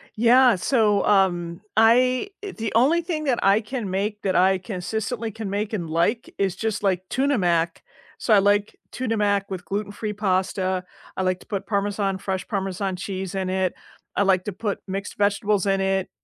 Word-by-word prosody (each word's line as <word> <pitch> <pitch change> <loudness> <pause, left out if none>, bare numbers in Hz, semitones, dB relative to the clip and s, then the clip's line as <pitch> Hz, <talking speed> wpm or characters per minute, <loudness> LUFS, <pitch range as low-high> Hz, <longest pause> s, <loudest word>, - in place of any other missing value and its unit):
Yeah, 240 +2 +5
so, 210 +1 +2
um, 175 -3 +2
I 250 - +4
eh, 400 - -5
the 225 -1 -3
only 285 +9 +4
thing 320 -3 -3
that 260 -4 0
I 200 +2 +4
can 225 -2 -4
make 205 +3 -2
that 190 -2 0
I 190 +1 +4
consistently 220 +4 -4
can 220 -1 -6
make 205 +2 -2
and 175 -6 -3
like 170 +9 0
is 195 -2 0
just, 220 0 -2
like, 185 -2 +1
Tuna 275 +1 +1
Mac. 170 -3 0 0.3
So, 225 - +1
I 205 - +7
like 205 +1 +2 0.2
tuna 230 -3 -2
mac 200 -1 +1
with 180 -2 -5
gluten-free 205 +3 -3
pasta, 185 -2 0 0.3
I - - 0
like 185 0 0
to - - -15
put 200 -2 -4
Parmesan 200 -1 0
fresh 190 -1 -4
Parmesan 195 -2 -2
cheese 190 0 -5
in 190 -1 -1
it, 185 -1 0 0.4
I - - +3
like 190 -2 +2
to 205 - -3
put 205 +2 -3
mixed 195 +1 -5
vegetables 205 -1 +1
in 195 0 +2
it, 190 -1 0
200 Hz, 185 wpm, -24 LUFS, 190-220 Hz, 0.4 s, I